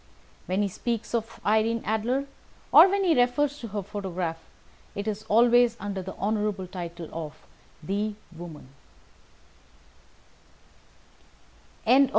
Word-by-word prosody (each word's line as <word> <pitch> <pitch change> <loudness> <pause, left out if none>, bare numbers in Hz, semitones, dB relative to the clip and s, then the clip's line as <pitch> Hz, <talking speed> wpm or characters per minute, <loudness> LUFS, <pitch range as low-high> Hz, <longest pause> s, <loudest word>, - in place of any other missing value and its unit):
And - - -30
when 185 +2 +1
he - - +1
speaks 230 +4 -3
of 225 -1 -2
Irene 220 +2 +2
Adler, 235 +6 0 0.5
or 385 - +9
when 395 +1 +1
he 350 -3 +4
refers 270 +4 +2
to 235 - -6
her 205 -1 -4
photograph, 180 -4 -4 0.6
it 205 +1 -4
is 215 -1 -2
always 240 +1 +5
under 200 -1 -3
the 190 +1 -7
honourable 210 -2 -1
title 175 -2 -7
of 155 -2 -6 0.5
the 205 +4 -1 0.2
woman. 165 -5 -9
210 Hz, 120 wpm, -27 LUFS, 185-235 Hz, 0.6 s, or